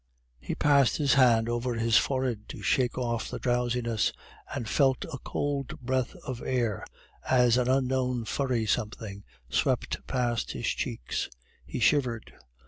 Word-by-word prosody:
He 60 Hz, -, -4 dB
passed 140 Hz, -3 st, +4 dB
his 145 Hz, -3 st, +3 dB
hand 120 Hz, -4 st, +5 dB
over 120 Hz, +1 st, -1 dB
his 115 Hz, 0 st, +2 dB
forehead 125 Hz, -3 st, +1 dB
to -, -, -8 dB
shake 125 Hz, -2 st, +1 dB
off 120 Hz, -2 st, -1 dB
the -, -, -4 dB
drowsiness, 120 Hz, -2 st, 0 dB, 0.4 s
and 115 Hz, -, -4 dB
felt 135 Hz, +2 st, +2 dB
a 130 Hz, -, -5 dB
cold 140 Hz, 0 st, -3 dB
breath 130 Hz, 0 st, -1 dB
of 125 Hz, -2 st, -5 dB
air 120 Hz, -5 st, -1 dB, 0.5 s
as 125 Hz, -2 st, +5 dB
an 125 Hz, 0 st, +2 dB
unknown 130 Hz, -2 st, +1 dB
furry 125 Hz, -3 st, 0 dB
something 105 Hz, -2 st, -2 dB, 0.2 s
swept -, -, 0 dB
past 120 Hz, -3 st, -1 dB
his -, -, -4 dB
cheeks. -, -, -2 dB, 0.4 s
He -, -, -4 dB
shivered. 125 Hz, -7 st, +1 dB
125 Hz, 140 wpm, -28 LUFS, 115-130 Hz, 0.5 s, hand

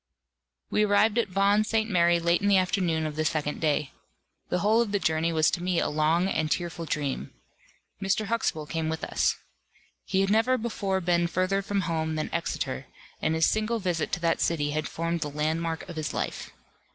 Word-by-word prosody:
We 210 Hz, -, +3 dB
arrived 210 Hz, +2 st, +3 dB
at 235 Hz, -, +1 dB
Vaughan 200 Hz, +3 st, +3 dB
St. 220 Hz, 0 st, 0 dB
Mary 175 Hz, -4 st, +3 dB
late 170 Hz, +2 st, +2 dB
in 200 Hz, -, +1 dB
the 200 Hz, -1 st, +5 dB
afternoon 180 Hz, -4 st, +1 dB
of 155 Hz, -1 st, -4 dB
the 155 Hz, -, 0 dB
second 150 Hz, -1 st, -1 dB
day. 150 Hz, -3 st, +1 dB, 0.6 s
The -, -, +1 dB
whole 220 Hz, +3 st, +4 dB
of 225 Hz, -4 st, -1 dB
the 205 Hz, -, +2 dB
journey 160 Hz, -2 st, +1 dB
was 160 Hz, -1 st, +3 dB
to 175 Hz, -, -2 dB
me 180 Hz, -1 st, +1 dB
a -, -, 0 dB
long 155 Hz, +4 st, +2 dB
and 155 Hz, -5 st, 0 dB
tearful 170 Hz, 0 st, -2 dB
dream. 140 Hz, -, -2 dB, 0.7 s
Mr. 195 Hz, +2 st, 0 dB
Huxtable 205 Hz, -8 st, -1 dB
came 160 Hz, +1 st, -2 dB
with 160 Hz, 0 st, -4 dB
us. -, -, +1 dB, 0.7 s
He 190 Hz, -1 st, +1 dB
had 195 Hz, 0 st, +1 dB
never 225 Hz, +4 st, +3 dB
before 200 Hz, -5 st, -2 dB
been 170 Hz, -1 st, +2 dB
further 185 Hz, +3 st, 0 dB
from 200 Hz, 0 st, -1 dB
home 160 Hz, -3 st, -1 dB
than 155 Hz, -, -3 dB
Exeter; -, -, -3 dB, 0.3 s
and 160 Hz, +1 st, +1 dB
his 160 Hz, 0 st, +3 dB
single 220 Hz, +2 st, +1 dB
visit 180 Hz, -6 st, -1 dB
to -, -, 0 dB
that 165 Hz, -1 st, +1 dB
city 145 Hz, -3 st, +1 dB
had 155 Hz, +1 st, -2 dB
formed 165 Hz, 0 st, -2 dB
the 150 Hz, -, -2 dB
landmark 160 Hz, +2 st, -2 dB
of 170 Hz, -2 st, -8 dB
his 155 Hz, -1 st, -3 dB
life. -, -, -3 dB
170 Hz, 200 wpm, -27 LUFS, 160-200 Hz, 0.7 s, the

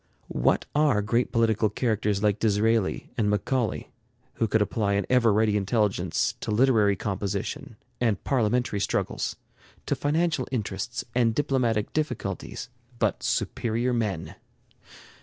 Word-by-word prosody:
What -, -, +1 dB
are 145 Hz, -9 st, +3 dB
great 115 Hz, +4 st, +1 dB
political 110 Hz, -2 st, +2 dB
characters 105 Hz, -2 st, 0 dB
like 105 Hz, -1 st, +2 dB
Disraeli 110 Hz, -1 st, +1 dB
and 105 Hz, -2 st, +2 dB
Macaulay, 110 Hz, +3 st, -1 dB, 0.5 s
who 115 Hz, -, +1 dB
could 110 Hz, -, +2 dB
apply 105 Hz, -1 st, 0 dB
an 100 Hz, -1 st, +1 dB
ever 120 Hz, -3 st, +5 dB
ready 105 Hz, 0 st, +2 dB
intelligence 100 Hz, -4 st, +1 dB
to -, -, -5 dB
literary 110 Hz, -3 st, +4 dB
composition 100 Hz, +7 st, -4 dB, 0.2 s
and 115 Hz, -5 st, 0 dB
parliamentary 120 Hz, -4 st, +1 dB
struggles, -, -, -1 dB, 0.5 s
to -, -, 0 dB
financial 155 Hz, -2 st, 0 dB
interests 110 Hz, 0 st, -3 dB
and 115 Hz, -2 st, +2 dB
diplomatic 120 Hz, -7 st, 0 dB
difficulties, 125 Hz, -, -3 dB, 0.3 s
but -, -, 0 dB
superior 115 Hz, -, -1 dB
men? 105 Hz, -8 st, -2 dB
110 Hz, 120 wpm, -26 LUFS, 105-125 Hz, 0.5 s, ever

